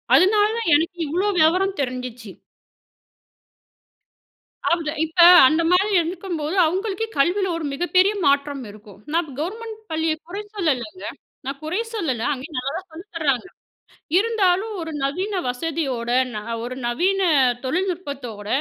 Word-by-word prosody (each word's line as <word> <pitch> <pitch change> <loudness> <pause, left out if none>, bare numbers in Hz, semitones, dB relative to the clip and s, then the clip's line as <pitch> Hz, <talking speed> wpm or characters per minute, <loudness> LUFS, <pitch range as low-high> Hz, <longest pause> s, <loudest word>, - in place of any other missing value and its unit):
அதனால 415 +2 +5
தான் 460 -7 -1
எனக்கு 335 +4 0
இவ்வளோ 355 +7 0
விவரம் 370 +5 +3
தெரிஞ்சுச்சு. 250 -4 -5 2.4
அவுத 335 -3 0 0.2
இப்ப 325 +3 -7 0.3
அந்த 315 +4 +2
மாரி 390 +4 +3
இருக்கும்போது, 340 -1 -4
அவங்களுக்கு 385 +5 -1
கல்வியில 360 +8 +2
ஒரு 325 - -4
மிகப்பெரிய 365 +6 +2
மாற்றம் 280 -1 +1
இருக்கும். 205 -1 -15
நான் 335 -2 0
கவர்மெண்ட் 440 +7 -5
பள்ளியை 320 0 0
குறை 390 +4 -5
சொல்லலைங்க. 320 - -2 0.4
நான் 275 +1 -5
குறை 330 +7 -2
சொல்லல. 270 - -2
அங்கேயும் 290 +2 -5
நல்லா 255 +2 -2
தான் 375 -1 -17
சொல்லி 330 +4 -10
தர்றாங்க. 285 -5 0 0.7
இருந்தாலும் 420 -1 +1
ஒரு 325 -1 -5
நவீன 370 +8 -1
வசதியோட, 260 -3 -3 0.2
ந - - -4 0.3
ஒரு 250 +1 -5
நவீன 370 +11 +1 0.4
தொழில்நுட்பத்தோட, 280 - -3
330 Hz, 125 wpm, -22 LUFS, 275-380 Hz, 2.4 s, அதனால